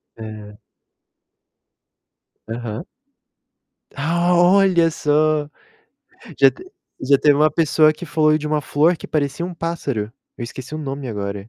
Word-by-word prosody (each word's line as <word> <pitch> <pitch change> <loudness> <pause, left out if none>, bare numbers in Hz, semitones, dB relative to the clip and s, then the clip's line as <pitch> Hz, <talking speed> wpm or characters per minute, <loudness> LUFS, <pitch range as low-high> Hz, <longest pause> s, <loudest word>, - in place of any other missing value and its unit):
É. 105 -2 -10 1.9
Aham. 115 +1 -5 1.1
Ah, 170 +5 +1
olha 175 -1 +4
só! 150 0 +1 0.9
Já - - +6
te 360 - -14 0.4
já 140 +1 +4
teve 145 -1 +4
uma 155 +2 +3
pessoa 155 0 +3
que 175 - -9
falou 155 -1 +2
de 150 0 -4
uma 150 0 0
flor 155 +5 +2
que - - -10
parecia 145 +2 -2
um 180 0 -6
pássaro, 140 -11 -3 0.2
eu 120 - -5
esqueci 130 +5 -8
o - - -4
nome 140 -2 -5
agora. 100 -1 -5
150 Hz, 130 wpm, -20 LUFS, 120-165 Hz, 1.9 s, Já